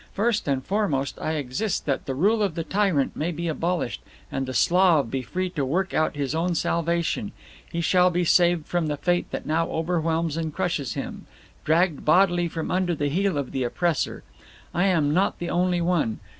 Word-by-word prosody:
First 215 Hz, -1 st, 0 dB
and 135 Hz, -2 st, 0 dB
foremost 185 Hz, -10 st, -1 dB
I 155 Hz, -, -1 dB
exist 155 Hz, -, -2 dB
that 140 Hz, -3 st, -2 dB
the 135 Hz, -, -2 dB
rule 210 Hz, -, +2 dB
of 195 Hz, -6 st, 0 dB
the 165 Hz, -, -2 dB
Tyrant 185 Hz, -5 st, +1 dB
may 165 Hz, +3 st, -1 dB
be 170 Hz, +1 st, -4 dB
abolished, 165 Hz, -3 st, -2 dB, 0.3 s
and 135 Hz, -1 st, -2 dB
the -, -, -3 dB
Slav 170 Hz, -9 st, +4 dB
be 135 Hz, -, -1 dB
free 185 Hz, +10 st, -3 dB
to 150 Hz, -6 st, -2 dB
work 180 Hz, +8 st, -1 dB
out 155 Hz, 0 st, +1 dB
his 140 Hz, -1 st, -2 dB
own 170 Hz, +2 st, 0 dB
salvation; 170 Hz, +6 st, -1 dB, 0.4 s
he 170 Hz, -, -2 dB
shall 180 Hz, +2 st, +4 dB
be 175 Hz, 0 st, 0 dB
saved 175 Hz, -1 st, +3 dB
from 175 Hz, -3 st, -1 dB
the 150 Hz, -1 st, -2 dB
fate 175 Hz, +3 st, 0 dB
that -, -, -5 dB
now 165 Hz, +2 st, 0 dB
overwhelms 165 Hz, -1 st, -1 dB
and 160 Hz, -1 st, -2 dB
crushes 150 Hz, -7 st, -1 dB
him; -, -, -6 dB, 0.4 s
dragged 165 Hz, -1 st, +2 dB
bodily 175 Hz, +1 st, +4 dB
from 160 Hz, -1 st, -4 dB
under 180 Hz, -2 st, +1 dB
the 145 Hz, -1 st, -1 dB
heel 190 Hz, +2 st, 0 dB
of 140 Hz, -3 st, -3 dB
the 130 Hz, -, -1 dB
oppressor. 165 Hz, +6 st, -1 dB, 0.5 s
I 175 Hz, +3 st, +2 dB
am 160 Hz, -6 st, +2 dB
not 190 Hz, +4 st, +1 dB
the 175 Hz, -, -4 dB
only 180 Hz, 0 st, +1 dB
one. 170 Hz, -10 st, 0 dB
170 Hz, 195 wpm, -25 LUFS, 150-180 Hz, 0.5 s, Slav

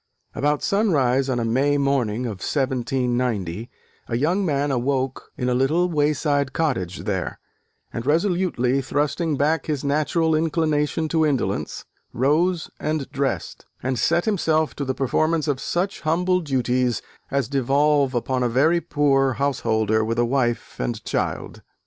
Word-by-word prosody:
About 145 Hz, +1 st, 0 dB
sunrise 140 Hz, -, +2 dB
on 125 Hz, -2 st, 0 dB
a 115 Hz, -, -1 dB
May 135 Hz, +5 st, +2 dB
morning 125 Hz, -5 st, 0 dB
of 105 Hz, -5 st, -4 dB
1790, 125 Hz, -, -1 dB, 0.4 s
a 115 Hz, -, -1 dB
young 170 Hz, +9 st, +1 dB
man 145 Hz, -4 st, 0 dB
awoke 130 Hz, +1 st, -1 dB
in 125 Hz, -, -1 dB
a 125 Hz, -, +2 dB
little 155 Hz, +8 st, +2 dB
wayside 145 Hz, -2 st, +1 dB
cottage 95 Hz, -, -1 dB
there: 95 Hz, -3 st, -2 dB, 0.6 s
and, 115 Hz, -, -3 dB
resolutely 160 Hz, -, +1 dB
thrusting 145 Hz, +3 st, -1 dB
back 150 Hz, +2 st, +1 dB
his 150 Hz, -4 st, -2 dB
natural 155 Hz, +3 st, +1 dB
inclination 155 Hz, -1 st, +1 dB
to 160 Hz, 0 st, +2 dB
indolence, 145 Hz, -5 st, -1 dB, 0.3 s
rose 160 Hz, +7 st, +1 dB
and 155 Hz, -2 st, -2 dB
dressed, 135 Hz, -1 st, -3 dB, 0.2 s
and 130 Hz, -1 st, -1 dB
set 170 Hz, +8 st, +2 dB
himself 160 Hz, -7 st, +1 dB
to 140 Hz, -, -2 dB
the 130 Hz, 0 st, -2 dB
performance 155 Hz, +4 st, +1 dB
of 140 Hz, -3 st, 0 dB
such 190 Hz, +3 st, -2 dB
humble 180 Hz, +3 st, +1 dB
duties 125 Hz, -5 st, 0 dB, 0.3 s
as 140 Hz, -4 st, 0 dB
devolve 140 Hz, 0 st, +2 dB
upon 130 Hz, +2 st, 0 dB
a 125 Hz, -, +1 dB
very 155 Hz, +8 st, +3 dB
poor 135 Hz, -3 st, +2 dB
householder 110 Hz, -5 st, +1 dB
with 115 Hz, +1 st, -2 dB
a 120 Hz, -, +3 dB
wife 120 Hz, -2 st, -1 dB
and -, -, -3 dB
child. -, -, -3 dB
140 Hz, 145 wpm, -23 LUFS, 125-155 Hz, 0.6 s, very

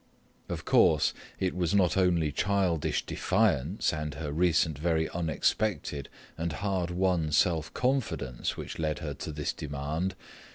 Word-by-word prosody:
Of -, -, -4 dB
course, -, -, +4 dB, 0.3 s
it 95 Hz, -1 st, 0 dB
was 90 Hz, +1 st, +1 dB
not 90 Hz, -5 st, +3 dB
only 85 Hz, -5 st, +2 dB
childish 85 Hz, -4 st, 0 dB
defiance 80 Hz, +10 st, +1 dB
and 75 Hz, -1 st, -3 dB
her 75 Hz, -1 st, -4 dB
recent 80 Hz, -2 st, +2 dB
very 80 Hz, -1 st, +1 dB
unexpected 85 Hz, -2 st, -1 dB, 0.3 s
and 85 Hz, -1 st, -1 dB
hard 95 Hz, -2 st, -1 dB
won 90 Hz, -3 st, +1 dB
self 80 Hz, 0 st, +2 dB
confidence 85 Hz, -, -1 dB
which -, -, -6 dB
led 75 Hz, -2 st, 0 dB
her 75 Hz, -2 st, -4 dB
to 75 Hz, -, -6 dB
this 75 Hz, -1 st, -2 dB
demand. 75 Hz, +6 st, -3 dB
80 Hz, 135 wpm, -29 LUFS, 75-90 Hz, 0.3 s, course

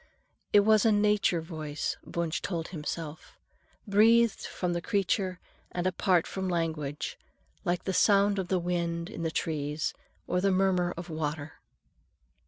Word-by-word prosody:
It 205 Hz, -, +7 dB
was 215 Hz, 0 st, +4 dB
a 225 Hz, -, +5 dB
nature 205 Hz, -4 st, +3 dB
voice, 155 Hz, -3 st, -4 dB
Wunsch 170 Hz, -1 st, -2 dB
told 170 Hz, -3 st, -3 dB
himself, 160 Hz, -1 st, -6 dB, 0.5 s
breathed 225 Hz, +2 st, +4 dB
from 180 Hz, -1 st, -2 dB
the 175 Hz, -, -2 dB
creature 190 Hz, -2 st, 0 dB, 0.3 s
and 175 Hz, 0 st, -3 dB
apart 185 Hz, -1 st, +2 dB
from 190 Hz, -1 st, -3 dB
language, 160 Hz, -4 st, -2 dB, 0.5 s
like 175 Hz, 0 st, 0 dB
the 190 Hz, -, -2 dB
sound 200 Hz, 0 st, +4 dB
of 185 Hz, -, -2 dB
the 185 Hz, -, +1 dB
wind 170 Hz, 0 st, -2 dB
in 220 Hz, -, -6 dB
the 165 Hz, -, 0 dB
trees, 150 Hz, -2 st, -2 dB, 0.3 s
or 180 Hz, -, 0 dB
the 195 Hz, -, +3 dB
murmur 185 Hz, -2 st, +2 dB
of 170 Hz, 0 st, -7 dB
water. 150 Hz, -1 st, -4 dB
175 Hz, 145 wpm, -29 LUFS, 160-195 Hz, 0.5 s, It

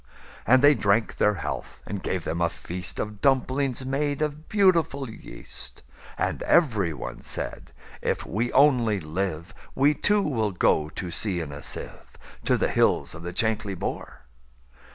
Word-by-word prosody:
And 130 Hz, +3 st, +6 dB
they 145 Hz, +1 st, +8 dB
drank 110 Hz, -2 st, +1 dB
their 105 Hz, 0 st, +3 dB
health, 85 Hz, -, -5 dB
and 100 Hz, 0 st, -5 dB
gave 95 Hz, -3 st, -2 dB
them 85 Hz, -, -2 dB
a 85 Hz, -, +3 dB
feastOf 90 Hz, +5 st, -6 dB
dumplings 135 Hz, -1 st, +1 dB
made 145 Hz, +2 st, 0 dB
of 150 Hz, +1 st, -4 dB
beautiful 170 Hz, -9 st, +3 dB
yeast; 110 Hz, -, -8 dB, 0.3 s
And -, -, -1 dB
every 110 Hz, -, +3 dB
one 75 Hz, -, -7 dB
said, -, -, -6 dB, 0.3 s
"If -, -, -1 dB
we 115 Hz, +5 st, -1 dB
only 125 Hz, -7 st, +4 dB
live, 85 Hz, +1 st, -3 dB, 0.2 s
We, 140 Hz, +3 st, +4 dB
too, 205 Hz, +7 st, +3 dB
will 110 Hz, -, 0 dB
go 75 Hz, -3 st, +2 dB
to 90 Hz, +2 st, -5 dB
sea 95 Hz, -1 st, 0 dB
in 80 Hz, -4 st, -5 dB
a 70 Hz, 0 st, -8 dB
sieve, -, -, -9 dB, 0.3 s
To -, -, +3 dB
the -, -, +1 dB
hills -, -, +2 dB
of 80 Hz, -, -9 dB
the 85 Hz, +1 st, -5 dB
Chankly 105 Hz, 0 st, 0 dB
Bore." 65 Hz, -, -5 dB
110 Hz, 155 wpm, -26 LUFS, 90-140 Hz, 0.3 s, they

